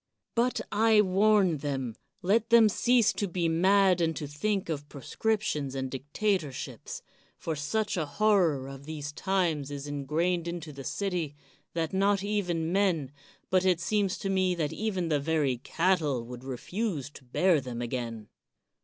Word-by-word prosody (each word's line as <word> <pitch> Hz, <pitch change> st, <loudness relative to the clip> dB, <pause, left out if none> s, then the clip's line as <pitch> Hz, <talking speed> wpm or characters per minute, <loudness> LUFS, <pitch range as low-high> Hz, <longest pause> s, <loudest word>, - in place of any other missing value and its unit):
But, 245 Hz, +2 st, +1 dB
I 220 Hz, 0 st, +5 dB
warn 195 Hz, -3 st, +3 dB
them, 135 Hz, -5 st, -3 dB, 0.3 s
let 215 Hz, +5 st, +2 dB
them 230 Hz, -2 st, +7 dB
cease 240 Hz, +2 st, +3 dB
to 205 Hz, -, -2 dB
be 175 Hz, -1 st, -1 dB
mad, 185 Hz, +2 st, +4 dB
and 165 Hz, -1 st, +1 dB
to 150 Hz, -, -4 dB
think 195 Hz, +7 st, -1 dB
of 145 Hz, -3 st, -4 dB
proscriptions 150 Hz, -, -2 dB
and 130 Hz, -1 st, -3 dB
dictatorships; 150 Hz, -, -3 dB, 0.3 s
for 160 Hz, -, -3 dB
such 185 Hz, +9 st, -1 dB
a 160 Hz, -3 st, -1 dB
horror 175 Hz, -7 st, +2 dB
of 135 Hz, 0 st, -9 dB
these 150 Hz, -1 st, -5 dB
times 170 Hz, -5 st, 0 dB
is 140 Hz, -1 st, -6 dB
ingrained 160 Hz, +5 st, -1 dB
into 170 Hz, -3 st, -5 dB
the 135 Hz, 0 st, -8 dB
city, 175 Hz, -4 st, -2 dB, 0.4 s
that 165 Hz, 0 st, -1 dB
not 195 Hz, +1 st, +2 dB
even 175 Hz, -6 st, -1 dB
men, 180 Hz, -8 st, +1 dB, 0.4 s
but 185 Hz, -1 st, +4 dB
it 185 Hz, -3 st, +3 dB
seems 205 Hz, 0 st, 0 dB
to 195 Hz, -, -3 dB
me 185 Hz, -1 st, +2 dB
that 155 Hz, -4 st, -2 dB
even 190 Hz, -6 st, -2 dB
the 150 Hz, -2 st, +2 dB
very 145 Hz, -4 st, +1 dB
cattle 155 Hz, -5 st, +1 dB
would 125 Hz, +1 st, -9 dB
refuse 145 Hz, -, -3 dB
to 140 Hz, -, -14 dB
bear 160 Hz, +5 st, +2 dB
them 125 Hz, -2 st, -6 dB
again. 120 Hz, -3 st, -4 dB
170 Hz, 155 wpm, -29 LUFS, 145-195 Hz, 0.4 s, them